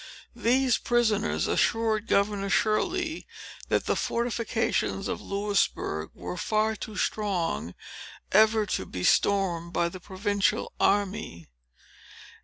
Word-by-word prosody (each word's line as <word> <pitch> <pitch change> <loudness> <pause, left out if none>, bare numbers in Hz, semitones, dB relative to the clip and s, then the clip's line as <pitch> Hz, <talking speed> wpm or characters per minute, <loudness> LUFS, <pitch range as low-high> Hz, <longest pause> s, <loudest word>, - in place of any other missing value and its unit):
These 255 +1 +2
prisoners 225 -3 +1
assured 225 -1 +1
Governor 200 0 +1
Shirley, 320 - 0 0.4
that - - +1
the - - +1
fortifications 235 -1 -1
of - - -3
Louisbourg 200 - -1
were 90 0 -6
far 220 0 +1
too 215 0 -7
strong 180 - -1 0.6
ever 215 +1 +5
to - - -3
be 90 - -5
stormed 175 - +2
by 170 - +1
the 185 - -9
provincial 200 +2 -1
army. 200 - 0
205 Hz, 105 wpm, -27 LUFS, 190-220 Hz, 0.6 s, ever